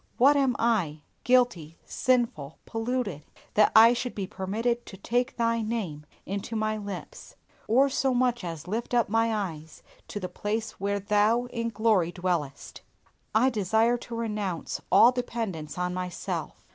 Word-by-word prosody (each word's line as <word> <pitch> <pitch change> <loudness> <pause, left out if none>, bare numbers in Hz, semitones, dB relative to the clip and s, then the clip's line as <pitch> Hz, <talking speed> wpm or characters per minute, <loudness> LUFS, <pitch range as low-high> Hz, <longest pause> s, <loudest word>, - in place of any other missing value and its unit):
What 280 +4 +6
am 270 -3 +2
I, 190 -11 0 0.2
guilty, 240 -11 +2
sinful, 235 - 0
polluted, 225 - -3 0.3
that 210 0 +5
I 225 +2 +9
should 245 0 -3
be 200 - -2
permitted 220 +5 -2
to 190 - -10
take 245 +6 -1
Thy 230 -1 +1
name 195 -10 -4 0.2
into 200 +4 -4
my 215 0 0
lips, 200 -4 -8 0.3
or 260 +5 +4
so 270 0 0
much 245 -2 +1
as 165 -2 -6
lift 230 +5 -2
up 235 -4 +2
my 225 +1 +2
eyes 165 -7 -5 0.2
to 205 - -5
the 185 - -4
place 215 +4 -3
where 200 +1 -1
Thou 210 +4 +2
in 230 -1 -1
glory 210 -6 +2
dwellest! 175 -6 -3 0.5
I 255 +4 +4
desire 220 +3 +2
to 235 0 -8
renounce 210 -6 -3
all 215 +6 +7
dependence 225 - -4
on 180 0 -1
myself. 180 -1 -5
220 Hz, 150 wpm, -27 LUFS, 185-235 Hz, 0.5 s, I